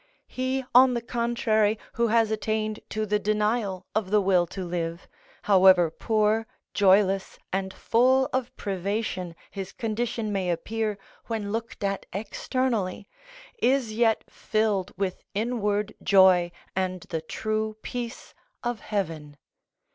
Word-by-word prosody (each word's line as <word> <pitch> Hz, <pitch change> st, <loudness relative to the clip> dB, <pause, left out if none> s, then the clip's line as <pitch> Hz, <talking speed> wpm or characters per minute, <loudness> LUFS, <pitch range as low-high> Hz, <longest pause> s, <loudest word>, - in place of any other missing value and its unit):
He, 260 Hz, +1 st, -2 dB
on 250 Hz, 0 st, +7 dB
the 235 Hz, -, -1 dB
contrary, 230 Hz, -2 st, +1 dB, 0.2 s
who 235 Hz, 0 st, +1 dB
has 225 Hz, -1 st, +3 dB
attained 215 Hz, 0 st, -1 dB
to 215 Hz, 0 st, -2 dB
the 210 Hz, 0 st, +1 dB
denial 210 Hz, -2 st, 0 dB
of 215 Hz, -3 st, -1 dB
the 210 Hz, +1 st, +4 dB
will 185 Hz, -3 st, +3 dB
to 185 Hz, +2 st, -6 dB
live, 170 Hz, 0 st, -3 dB, 0.4 s
however 185 Hz, -4 st, +6 dB
poor, 215 Hz, +4 st, +1 dB, 0.3 s
joyless, 195 Hz, -1 st, +3 dB, 0.2 s
and 190 Hz, 0 st, -1 dB
full 260 Hz, +6 st, +3 dB
of 255 Hz, -1 st, -1 dB
privation 190 Hz, -2 st, -3 dB, 0.2 s
his 195 Hz, -2 st, -6 dB
condition 225 Hz, -1 st, -2 dB
may 190 Hz, -2 st, -1 dB
appear 210 Hz, +5 st, -2 dB, 0.3 s
when 215 Hz, -3 st, -3 dB
looked 225 Hz, -1 st, -4 dB
at 195 Hz, 0 st, -2 dB
externally, 210 Hz, -1 st, -2 dB, 0.5 s
is 255 Hz, -4 st, +2 dB
yet 225 Hz, 0 st, +2 dB
filled 215 Hz, -4 st, -1 dB
with 190 Hz, -2 st, -2 dB
inward 210 Hz, -2 st, 0 dB
joy 185 Hz, -3 st, +5 dB, 0.2 s
and 185 Hz, -1 st, -1 dB
the 160 Hz, -, -1 dB
true 215 Hz, +5 st, -2 dB
peace 240 Hz, 0 st, -6 dB, 0.3 s
of 240 Hz, -2 st, -2 dB
heaven. 160 Hz, -8 st, -4 dB
210 Hz, 125 wpm, -26 LUFS, 190-225 Hz, 0.5 s, on